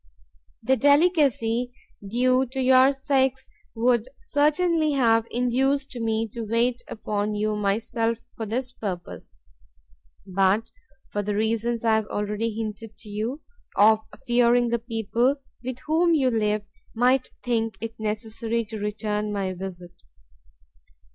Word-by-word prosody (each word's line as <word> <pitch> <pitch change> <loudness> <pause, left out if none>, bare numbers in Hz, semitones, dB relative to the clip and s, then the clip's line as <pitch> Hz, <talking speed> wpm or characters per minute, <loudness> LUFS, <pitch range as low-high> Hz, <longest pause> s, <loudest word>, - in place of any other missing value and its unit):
The 265 +3 +3
delicacy 280 - +3 0.3
due 255 +5 +2
to 265 +2 -6
your 260 +1 +6
sex 265 -1 0 0.3
would 235 +1 +2
certainly 310 +1 +2
have 230 -4 +3
induced 265 +3 0
me 225 -1 -1
to 230 +2 -6
wait 235 +3 +1
upon 210 -1 -2
you 215 +1 0
myself 225 +3 0 0.2
for 225 - -5
this 250 +4 -2
purpose, 185 - -6 0.9
but 195 +4 +1 0.4
for 205 - -1
the 205 0 -2
reasons 230 +2 0
I 225 - +4
have 220 -1 +1
already 210 +2 -2
hinted 220 0 -6
to 215 - -11
you, 225 +8 -3 0.3
of 215 +1 +6 0.3
fearing 240 0 +3
the 235 0 0
people 230 +3 0 0.3
with 255 0 -4
whom 330 +2 +3
you 265 -4 +2
live 210 -2 0 0.3
might 250 +3 +3
think 225 -2 -1
it 225 0 -7
necessary 220 +1 -2
to 215 0 -7
return 210 0 -2
my 195 -2 -2
visit. 180 -1 -7
230 Hz, 130 wpm, -25 LUFS, 215-255 Hz, 0.9 s, your